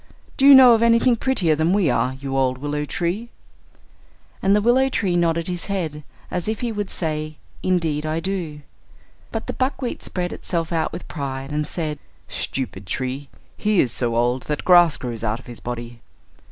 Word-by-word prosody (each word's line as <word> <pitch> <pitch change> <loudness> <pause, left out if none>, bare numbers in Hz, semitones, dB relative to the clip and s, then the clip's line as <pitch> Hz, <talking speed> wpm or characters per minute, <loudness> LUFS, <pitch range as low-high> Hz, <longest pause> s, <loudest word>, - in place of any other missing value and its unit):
Do 270 - +4
you 280 - +11
know 255 -2 +9
of 225 - +3
anything 235 +1 +4
prettier 210 - +1
than 160 +4 +1
we 200 -4 +3
are, 130 -2 +1
you 135 0 -5
old 130 -1 +1
willow 145 +2 -3
tree?" 175 +10 -2 1.1
And 195 +1 +4
the 210 - +3
willow 255 +4 +3
tree 190 -8 0
nodded 170 -1 +1
his 180 -2 -3
head, 160 -7 -3 0.3
as 180 +1 -2
if 220 +2 -2
he 240 -2 -1
would 205 -2 -3
say, 155 -2 -3 0.2
"Indeed 165 -5 0
I 155 +1 -1
do." 165 -5 -4 0.7
But - - -4
the - - -4
buckwheat 260 -1 -2
spread 180 -1 -3
itself 170 -2 -3
out 165 -2 0
with - - -8
pride, 135 -2 -5
and 150 0 -1
said, 155 -4 -3 0.3
"Stupid 105 -8 -5
tree; 130 +6 -3 0.3
he 210 -3 +1
is 125 - +3
so 120 -1 -1
old 120 +2 +1
that 150 - -2
grass 175 -4 +6
grows 120 -3 -5
out 110 +1 -1
of - - -16
his 120 -2 -7
body." 120 -1 -6
160 Hz, 185 wpm, -22 LUFS, 135-195 Hz, 1.1 s, you